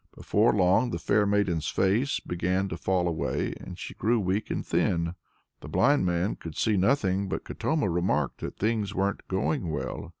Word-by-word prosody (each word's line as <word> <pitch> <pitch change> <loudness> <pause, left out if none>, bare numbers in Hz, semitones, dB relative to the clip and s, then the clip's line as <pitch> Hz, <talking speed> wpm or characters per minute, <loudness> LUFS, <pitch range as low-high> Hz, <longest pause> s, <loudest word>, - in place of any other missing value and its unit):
Before 110 +4 +2
long 95 +5 +3
the - - -2
fair 105 0 +2
maiden's 95 -6 +1
face 110 +9 +1
began 90 +2 -1
to 80 - -4
fall 90 0 0
away, 80 -4 -1
and - - -9
she - - -7
grew 115 +2 +1
weak 100 +2 -1
and - - -3
thin. 85 -1 0 0.5
The - - -10
blind 140 -6 +3
man 90 +3 0
could 80 -2 -8
see 110 - +2
nothing, 100 -2 +1
but - - -3
Katoma 155 -9 -1
remarked 85 -5 0
that - - -6
things 105 -2 -1
weren't 100 +1 -1
going 95 - -1
well. 75 - -4
95 Hz, 175 wpm, -27 LUFS, 90-105 Hz, 0.5 s, long